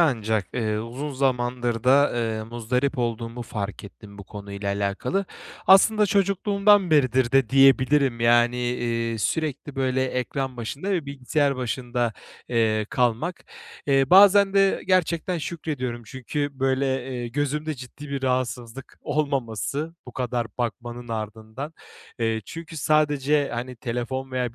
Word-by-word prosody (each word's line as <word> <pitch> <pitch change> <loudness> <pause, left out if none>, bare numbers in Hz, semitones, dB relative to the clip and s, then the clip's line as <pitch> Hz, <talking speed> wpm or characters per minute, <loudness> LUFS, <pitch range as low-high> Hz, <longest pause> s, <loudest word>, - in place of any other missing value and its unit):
ancak, 110 - +1
eee, 110 -3 -1
uzun 125 +7 -5
zamandır 125 -3 -1
da, 140 +3 +5
ııı, 110 -2 -2
muzdarip 125 +4 -1
olduğumu 115 0 -3
fark 105 -3 -5
ettim 100 0 -13
bu 100 - -9
konuyla 100 0 -7
alakalı. 100 - -1 0.4
Aslında 210 +2 +6
çocukluğumdan 200 0 +3
beridir 130 -4 +3
de 135 -4 +4
diyebilirim, 135 -1 +4
yani, 120 +1 +4
eee, 120 -2 -1
sürekli 150 +3 -2
böyle 130 -1 +1
ekran 130 +1 -3
başında 140 - -4
ve 175 -7 -1
bilgisayar 140 +1 0
başında, 120 -1 -2 0.4
eee, 110 -3 +1
kalmak. 125 +8 0 0.4
Eee, 135 -1 +4
bazen 200 +1 +7
de 195 -1 +3
gerçekten 180 -1 +1
şükrediyorum. 145 -7 -4
Çünkü, 140 +3 -3
böyle, 130 -1 0
eee, 120 -2 -4
gözümde 145 +4 -2
ciddi 135 +3 -10
bir 140 -1 -3
rahatsızlık 125 -1 -3
olmaması 140 - -2
bu 125 - -10
kadar 125 -2 -2
bakmanın 120 0 -4
ardından. 110 +6 -6 0.4
Eee, 115 -1 0
çünkü 165 - -9
sadece, 150 -1 +2
hani, 125 +2 -5
telefon 125 +3 -4
veya 125 -2 -2
130 Hz, 125 wpm, -24 LUFS, 115-145 Hz, 0.4 s, bazen